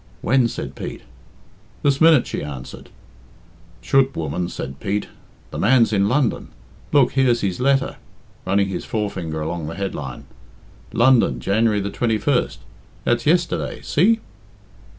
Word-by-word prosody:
"When?" 130 0 +3
said - - -6
Pete. - - -7 0.8
"This 140 0 +2
minute," 160 -5 +6
she - - -4
answered. 70 -3 -8 0.9
"Chut! 135 0 +2
woman," 80 +3 -2
said 65 0 -6
Pete; 100 +1 -2 0.4
"the - - -5
man's 115 -1 +4
in 100 0 +2
London. 130 -1 0 0.4
Look, 135 -4 +4
here's 125 -3 +2
his 95 -3 -2
letter" 135 +1 +1 0.5
running 100 +1 +1
his 95 - -4
forefinger 95 -8 -3
along 80 0 -3
the 80 - -6
headline 75 -10 -5 0.7
'"London, 120 - +3
January 105 - +1
21st 110 - 0 0.5
that's 120 +3 0
yesterday. 170 +2 +1
See!" 220 +8 +3
110 Hz, 125 wpm, -21 LUFS, 90-130 Hz, 0.9 s, minute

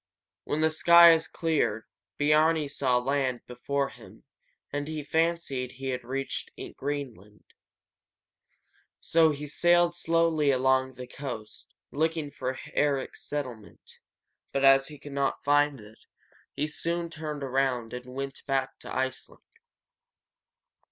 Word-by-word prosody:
When 150 - -1
the 160 0 +3
skies 170 0 +7
cleared 150 -10 -1 0.3
Biarni 155 +1 +3
saw 130 -3 +1
land 130 -1 0
before 140 +3 -2
him, - - -15 0.5
and 145 +1 -3 0.2
fancied 160 -6 0
he 135 0 -5
had 125 -1 -3
reached 135 +2 -4 0.3
Greenland. 125 -8 -6 1.6
So 165 -1 +4
he 150 0 -4
sailed 175 +3 +3
slowly 165 -3 +1
along 130 0 +2
the 125 - -7
coast, 125 -5 -8 0.2
looking 160 0 -1
for 130 -1 -4 0.2
Eric's 140 -2 0
settlement; 125 -8 -7 0.5
but, 140 0 +1
as 135 0 +6
he 150 - -10
could 145 +1 -11
not 140 0 -1
find 145 -1 +3
it, 105 +1 -15 0.6
he 150 - -1
soon 170 +2 -3
turned 150 -2 -5
around 130 -3 -1
and 125 0 -7
went 135 +2 -6
back 135 -1 -1
to - - -10
Iceland. 130 0 -4
140 Hz, 120 wpm, -28 LUFS, 130-155 Hz, 1.6 s, skies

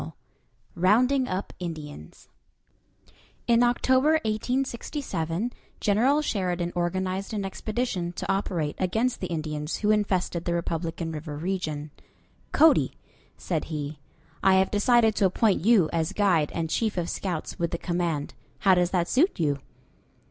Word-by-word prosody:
II 80 - -6 0.7
ROUNDING 250 +9 +3
UP 185 +2 -4
INDIANS 150 - -8 1.2
In 235 0 +4
October, 260 +4 +3
1867, 230 - -2 0.3
General 250 +9 +3
Sheridan 180 -8 -1
organized 185 +3 -2
an 200 -2 -2
expedition 195 -3 -2
to - - -5
operate 175 -6 -1
against 225 +7 0
the 185 - -3
Indians 155 -2 -3
who 210 0 +1
infested 185 -5 0
the 170 - 0
Republican 165 -1 -3
River 150 -1 -6
region. 155 -4 -3 0.6
"Cody," 320 +1 +5 0.4
said 165 -4 -2
he, 150 -2 -5 0.4
"I 190 -1 +5
have 190 0 +3
decided 225 +1 +4
to 200 - +3
appoint 195 0 +1
you 210 -6 +5
as 160 -1 0
guide 180 -8 +2
and 165 -1 -1
chief 215 +4 -1
of 170 -1 -1
scouts 175 -3 -4
with 170 0 0
the 170 - -3
command. 170 -4 -2 0.3
How 195 -3 +5
does 180 -1 +3
that 175 -2 0
suit 315 - +2
you?" 145 -3 +1
185 Hz, 135 wpm, -26 LUFS, 165-215 Hz, 1.2 s, Cody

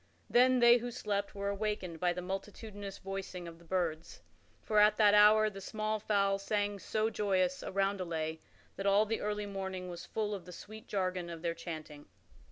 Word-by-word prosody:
Then 255 +1 +5
they 240 0 +7
who 245 +1 -4
slept 205 -4 -3
were 200 0 -2
awakened 200 -5 -3
by 180 +1 +2
the 180 0 -4
multitudinous 200 +1 -6
voicing 190 -2 -6
of 165 0 -10
the - - -17
birds; 170 -2 -3 0.4
for 215 -1 +2
at 210 0 +5
that 210 -2 +6
hour 210 +1 +7
the 195 -2 -6
small 215 +2 -2
fowl 200 -2 +1
sang 205 0 -1
so 215 +3 -1
joyous 185 -4 +1
a - - -5
roundelay 180 -5 -1 0.4
that 195 - -2
all 200 +2 +5
the 225 +1 -2
early 210 0 -2
morning 190 -2 -5
was 175 - -8
full 210 -1 -2
of 190 -4 -6
the 180 - -10
sweet 215 +5 -11
jargon 185 -3 -2
of 165 -1 -8
their 170 -1 0
chanting. 155 -3 -8
200 Hz, 185 wpm, -33 LUFS, 180-210 Hz, 0.4 s, they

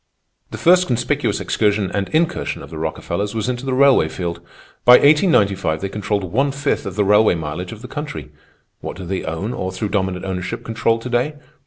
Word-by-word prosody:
"The - - -7
first 180 +1 +4
conspicuous 125 -1 0
excursion 105 -3 0
and 100 -1 -2
incursion 165 +1 -1
of - - -12
the 80 - -6
Rockefellers 85 +6 -3
was 110 +1 -2
into 125 +1 -3
the 130 - 0
railway 135 - +5
field. 85 0 -4 0.5
By 125 - +8
1895 105 - +4
they 100 - -4
controlled 105 0 -2
one 130 +11 0
fifth 140 -5 -2
of 95 - -6
the 105 -1 +1
railway 105 -1 +4
mileage 80 +3 -5
of 115 +1 -10
the - - -7
country. 145 - -6 0.5
What - - -7
do 95 - -7
they 95 +1 -3
own 90 +9 -3
or, 95 -5 -3
through 100 +3 -3
dominant 95 -2 -1
ownership, 90 -2 -4
control 115 0 0
to 115 - -7
day? 125 +5 0
105 Hz, 195 wpm, -20 LUFS, 95-125 Hz, 0.5 s, By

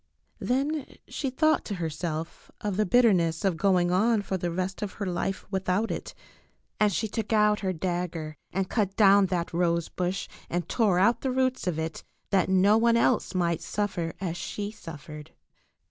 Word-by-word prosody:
Then 280 +3 -1
she 275 - -3
thought 310 +4 +2
to 205 - -3
herself 165 -1 -4
of 205 -2 -2
the 210 0 +1
bitterness 180 -8 +3
of 190 -3 +2
going 180 -1 +2
on 210 +3 +3
for 195 - -2
the 175 -1 -2
rest 185 +3 -3
of 205 -2 -3
her 205 - -4
life 185 +1 -2
without 190 +3 0
it, - - -5 0.6
and 210 -1 +4
she 220 +4 -1
took 220 +1 -4
out 210 -1 +4
her 190 -2 -1
dagger 175 -3 -3 0.2
and 190 +1 -1
cut 200 -3 -1
down 200 -2 +6
that 175 -2 -2
rose 170 -1 +1
bush 180 +1 -2 0.2
and 175 0 -2
tore 210 -7 +2
out 220 +6 +3
the 265 - -1
roots 255 -4 0
of 170 -3 0
it, 160 0 -4 0.3
that 190 -2 +2
no 195 +3 +5
one 235 0 +4
else 235 -4 +1
might 170 -3 +1
suffer 190 -5 -2
as 175 -3 -3
she 205 +3 -4
suf 165 -9 -10
fered. 150 -1 -9
190 Hz, 180 wpm, -27 LUFS, 175-215 Hz, 0.6 s, down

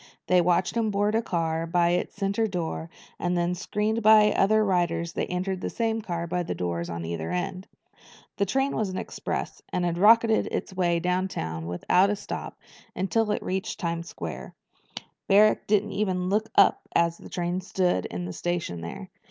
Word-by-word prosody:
They 180 0 +4
watched 175 +3 +1
him 225 -2 +1
board 205 +1 +1
a 225 - +2
car 165 -5 -1
by 170 0 +2
its 175 - -1
center 200 +2 0
door 170 -3 -4 0.3
and 175 0 0
then, 175 +1 +1
screened 210 +4 -1
by 215 -1 +7
other 215 +2 +3
riders, 170 -3 0
they - - -2
entered 185 +1 -2
the - - -2
same 225 -1 -1
car 170 -5 -3
by 175 +1 -1
the 170 - -3
doors 85 -1 -3
at 85 -1 -4
either 80 -1 -4
end. 185 +1 -3 0.7
The 200 - +1
train 270 +6 0
was 215 -3 0
an 185 - -5
express, - - -4
and 180 - 0
it 170 -1 -1
rocketed 225 +2 +5
its - - -4
way 175 -2 +1
downtown 180 - -2
without 180 - +2
a 210 - +1
stop - - -6 0.4
until 210 +4 0
it 210 - -1
reached 190 +4 -3
Times 170 -2 -3
Square. - - -7 0.7
Barrack 210 +2 +4
didn't 210 0 +2
even 185 -3 -1
look 215 +3 0
up - - +5
as 170 0 +2
the - - -11
train 175 +1 -2
stood 180 - 0
in 90 0 -5
the 90 - -5
station 170 - -3
there. 85 +1 -7
180 Hz, 185 wpm, -26 LUFS, 170-210 Hz, 0.7 s, by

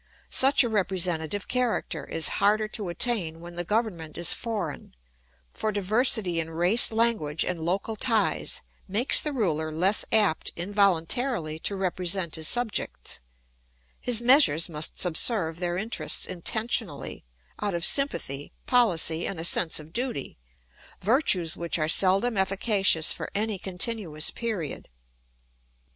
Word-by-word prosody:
Such 275 +1 +4
a - - -1
representative 185 -4 -1
character 235 - -2
is 165 - -1
harder 215 +2 +2
to 210 -4 -3
attain 175 -5 -1
when 175 +1 -10
the 175 0 -3
government 180 -6 -3
is 170 0 +3
foreign, 205 - -5 0.6
for 215 - -2
diversity 205 -3 +2
in 165 0 -4
race 175 +10 +3
language 220 -10 0
and 180 -2 -3
local 190 +7 -2
ties 225 0 +2 0.3
makes 215 +7 +4
the 300 - -3
ruler 160 - -1
less 185 +7 +2
apt 210 -7 +2
involuntarily 185 - 0
to 200 - -2
represent 185 -2 -1
his 160 -1 -1
subjects; 240 -3 -2 0.8
his 240 -2 0
measures 240 - +5
must 155 -2 0
subserve 170 -1 0
their 175 -1 -2
interests 220 +5 -1
intentionally, 200 - -3 0.4
out 205 -3 -2
of 170 +1 +2
sympathy, 145 - +1
policy, 175 -9 +2
and 190 - -5
a - - -4
sense 170 -1 +2
of 155 +2 -14
duty, 240 - -4 0.6
virtues 190 - +1
which 170 0 -1
are 155 -1 -1
seldom 195 +7 +2
efficacious 195 -3 +2
for - - -7
any 210 -1 -1
continuous 185 -5 -2
period. 205 - -5
190 Hz, 130 wpm, -26 LUFS, 165-225 Hz, 0.8 s, measures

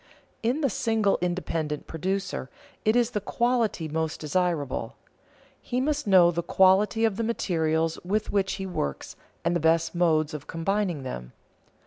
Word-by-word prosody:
In 245 +7 0
the 275 - +2
single 220 -1 +1
independent 165 -4 -2
producer 190 -3 -3 0.3
it 215 +1 +3
is 240 -1 +3
the 210 - -2
quality 235 -9 0
most 160 0 -2
desirable. 155 -3 -1 0.7
He 250 - -2
must 295 -1 -1
know 180 -3 +6
the 170 0 -1
quality 190 +6 +4
of 210 -3 0
the 230 - -1
materials 165 -7 0
with 205 +4 -1
which 195 -1 +1
he 195 - -4
works 75 - -4 0.3
and 170 +1 +2
the - - +2
best 165 +1 +2
modes 160 -3 +2
of 150 -2 -7
combining 175 -2 -1
them. 60 - -6
180 Hz, 150 wpm, -26 LUFS, 160-210 Hz, 0.7 s, know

